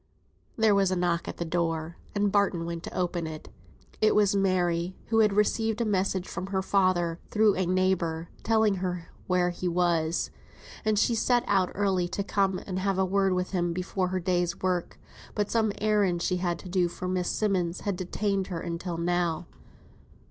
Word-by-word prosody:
There 220 -2 +4
was 195 -1 +3
a 185 - 0
knock 175 -1 0
at - - -6
the 170 - -3
door, 165 -1 -1 0.2
and 205 0 +2
Barton 195 -4 +2
went 170 0 -4
to - - -7
open 175 -2 -1
it. 155 -1 -8 0.5
It 215 - +4
was 205 -1 +4
Mary, 180 -2 +1
who 225 0 +3
had 215 -2 +5
received 220 +2 +1
a 235 - +1
message 190 -2 0
from 185 - -5
her 190 -1 -1
father, 185 -4 +2
through 215 -1 +4
a 185 -1 0
neighbour, 175 -3 +1
telling 220 -3 +2
her 180 -2 -3 0.2
where 180 -1 +2
he 180 +1 -4
was; 170 -2 +1 0.5
and 215 -1 +1
she 235 - +3
had 225 - 0
set 245 +1 +2
out 190 -2 +2
early 190 -3 +1
to 200 +3 -3
come 195 -1 +1
and 185 -1 -3
have 195 0 0
a 190 - +3
word 195 0 +2
with 180 0 -1
him 175 -2 0
before 185 +1 -1
her 185 +1 -1
day's 175 -1 0
work; 180 -2 -1 0.4
but 210 -1 -1
some 220 -2 +2
errands 205 -5 +1
she 180 - +1
had 175 -1 -1
to 185 - -11
do 180 -1 +2
for 175 +1 -6
Miss 180 -1 -1
Simmonds 185 -5 0
had 200 -2 -1
detained 195 +1 -1
her 175 -3 -4
until 170 +1 -4
now. 175 -1 0
185 Hz, 190 wpm, -28 LUFS, 175-200 Hz, 0.5 s, had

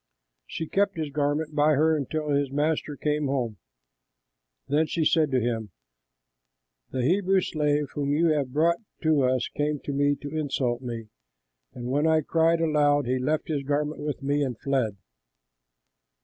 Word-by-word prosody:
She 165 - -4
kept 200 0 +1
his 155 -3 -3
garment 150 +2 -1
by 150 +1 +4
her 160 +3 +3
until 150 +1 -3
his 140 -1 +1
master 150 +1 -1
came 150 0 0
home; 125 -6 -2 1.1
then 150 +3 +2
she 160 -1 -1
said 155 -1 +3
to 130 -2 +2
him, 115 -3 -2 1.2
"The 130 - -2
Hebrew 190 +6 +3
slave 150 -3 0
whom 145 -1 -1
you 165 +3 +3
have 145 -4 0
brought 165 +5 +2 0.2
to 155 -3 +3
us 130 -1 +1
came 150 0 0
to 145 - -4
me 145 +1 +2
to 145 +2 -8
insult 135 -5 -1
me; 115 -3 -6 0.7
and 120 - -6
when 145 +3 +2
I 160 -1 +4
cried 165 +2 +2
aloud, 145 -3 +3
he 130 +1 0
left 150 +4 -1
his 150 -3 -1
garment 145 +2 -2
with 145 -1 -4
me 145 +1 +1
and 125 -5 -2
fled." 130 -7 0
145 Hz, 165 wpm, -26 LUFS, 135-155 Hz, 1.2 s, by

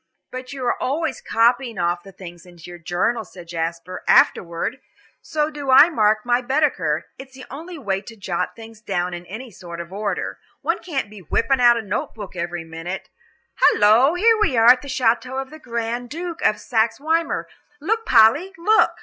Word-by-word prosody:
"But 255 +1 -7
you 270 -2 -5
are 240 - -1
always 295 +2 -2
copying 235 0 +1
off 175 0 0
the 195 - -13
things 175 -2 -12
into 175 -1 -13
your 175 - -10
journal," 180 +7 -1
said 175 -4 -13
Jasper, 170 +2 -4
"afterward. 175 +9 +2 0.4
So 305 0 -1
do 290 -2 -6
I 290 +6 +8
mark 215 -5 +2
my 245 0 +2
Baedeker; 245 - 0
it's 265 0 -11
the 260 - -10
only 330 +6 -8
way 195 -8 -2
to 225 +3 -12
jot 190 -4 -3
things 225 -1 -12
down 180 -4 -2
in 175 0 -8
any 230 +6 -8
sort 170 -2 -9
of 170 +2 -8
order. 205 +1 -3 0.2
One - - 0
can't 285 -10 -3
be 210 - -11
whipping 250 - 0
out 240 -1 +6
a 230 - -3
note 200 - -3
book 205 -4 -9
every 175 -1 -4
minute. 165 +3 -7 0.5
Halloo, 230 +10 +5
here 445 +4 +4
we 275 - +2
are 230 +2 +8
at 250 0 +3
the 285 - -10
château 255 0 0
of 270 -1 -6
the 310 - -11
Grand 235 -1 -4
Duke 340 +3 -6
of 210 - +2
Saxe 225 -1 0
Weimar. 325 +3 -1 0.3
Look, 445 +9 -1
Polly! 260 - +4
look!" 430 +6 +3
230 Hz, 190 wpm, -21 LUFS, 185-270 Hz, 0.5 s, I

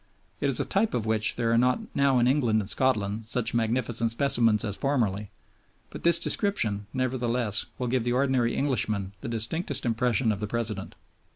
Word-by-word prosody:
It 140 - 0
is 135 - +6
a - - 0
type 205 - 0
of 115 -3 -2
which 110 -1 +2
there 115 -1 -1
are 115 - +3
not 125 - +2 0.2
now 140 -2 +2
in 120 - +3
England 125 -5 +2
and 100 - -4
Scotland 110 -3 0
such 120 0 0
magnificent 115 0 0
specimens 115 -3 +2
as 100 -2 -3
formerly; 105 -8 -1 0.6
but - - -9
this 170 0 +6
description, 115 - 0
nevertheless, 125 -4 -1
will 125 - -3
give 125 0 -1
the 120 +1 -1
ordinary 130 -2 +1
Englishman 110 -8 -1
the 140 - -6
distinctest 125 +6 0
impression 120 0 +1
of 100 - -3
the 105 - -4
President. 110 -3 -4
120 Hz, 180 wpm, -26 LUFS, 110-130 Hz, 0.6 s, is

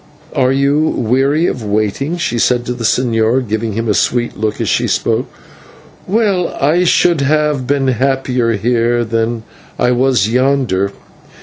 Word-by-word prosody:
"Are 130 -1 +2
you 140 +2 +2
weary 140 +2 +1
of 125 - -2
waiting?" 110 - -1
she 170 -9 -2
said 120 +1 +1
to 125 - -2
the 120 -1 -7
señor, 115 +1 +1
giving 110 +1 -2
him 115 +2 -3
a 105 - +2
sweet 120 +3 0
look 110 0 -3
as - - -2
she - - +1
spoke. - - 0 0.8
"Well, 200 -4 0
I 160 +6 +2
should 170 -3 +3
have 150 -2 0
been 140 -1 0
happier 130 -1 0
here 120 +2 0
than 115 0 -2 0.3
I 125 - +2
was 125 -4 +2
yonder. 125 -6 +1
125 Hz, 150 wpm, -15 LUFS, 115-140 Hz, 0.8 s, should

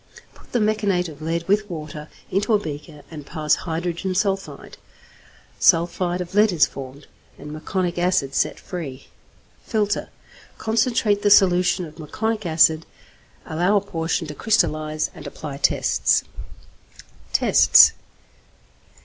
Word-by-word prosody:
Put - - -21
the - - +1
meconate 205 -5 0
of 155 -1 -13
lead 165 +1 -3
with 205 +1 +1
water 155 -2 -7 0.2
into 205 +3 +2
a - - +2
beaker 150 -3 -8
and 155 -2 -8
pass 150 +1 -1
hydrogen 175 +2 -3
sulphide; 195 0 -3 0.8
sulphide 175 +1 +2
of 180 0 -7
lead 210 +1 +4
is 165 -4 +4
formed, 135 +1 -10 0.3
and 150 +1 -9
meconic 175 +3 -3
acid 175 -6 +1
set - - 0
free. 150 -8 -8 0.5
Filter. 210 -3 -1 0.5
Concentrate 220 -2 +1
the 205 - +2
solution 180 -2 +4
of 155 0 -13
meconic 215 +6 -3
acid, 160 0 +3 0.6
allow 175 +6 +1
a - - +1
portion 165 -3 -2
to 150 - -7
crystallize, 155 -6 0
and - - -10
apply 145 -3 -7
tests. - - +2 1.1
_Tests. - - +6
175 Hz, 125 wpm, -22 LUFS, 155-200 Hz, 1.1 s, Tests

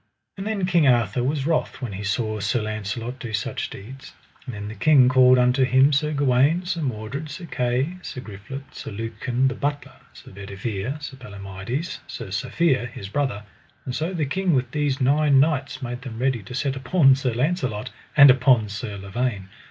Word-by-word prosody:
And 195 +1 -5
then 210 -4 0
King 175 -5 +3
Arthur 120 -2 +2
was 135 +1 -1
wroth 165 0 0
when 120 -6 -5
he 100 +2 -5
saw 110 +1 -1
Sir 105 +3 0
Launcelot 110 +4 -4
do 115 -3 -6
such 125 +5 -2
deeds; 130 +7 -11 0.3
and 125 - -5
then 105 0 -6
the 105 - -6
king 130 +4 +5
called 130 0 +6
unto 125 +2 +3
him 130 +3 +4
Sir 150 +2 +1
Gawaine, 145 +5 +2
Sir 175 -2 -2
Mordred, 130 +3 -4
Sir 170 +5 -7
Kay, 130 +5 -1
Sir 130 - -7
Griflet, 125 +5 -9
Sir - - -7
Lucan 120 +4 -1
the 130 - 0
Butler, 145 0 -3 0.2
Sir - - -14
Bedivere, 100 +6 -5
Sir 140 -2 -8
Palomides, 100 - -5
Sir 115 -5 -7
Safere, 125 - +1
his 95 -3 -8
brother; 130 -5 -1 0.4
and 125 - -4
so 160 +4 -1
the 165 -5 -1
king 180 +3 +1
with 125 -1 0
these 145 -2 0
nine 140 +1 +4
knights 145 -1 0
made 125 0 -5
them 125 -4 -7
ready 130 -1 0
to 115 +6 -9
set 140 0 -1
upon 135 +1 +4
Sir 130 -3 -1
Launcelot, 125 - -1 0.3
and 145 -2 +10
upon 125 -4 +3
Sir 105 0 -5
Lavaine. 100 0 -3
130 Hz, 185 wpm, -23 LUFS, 110-145 Hz, 0.4 s, and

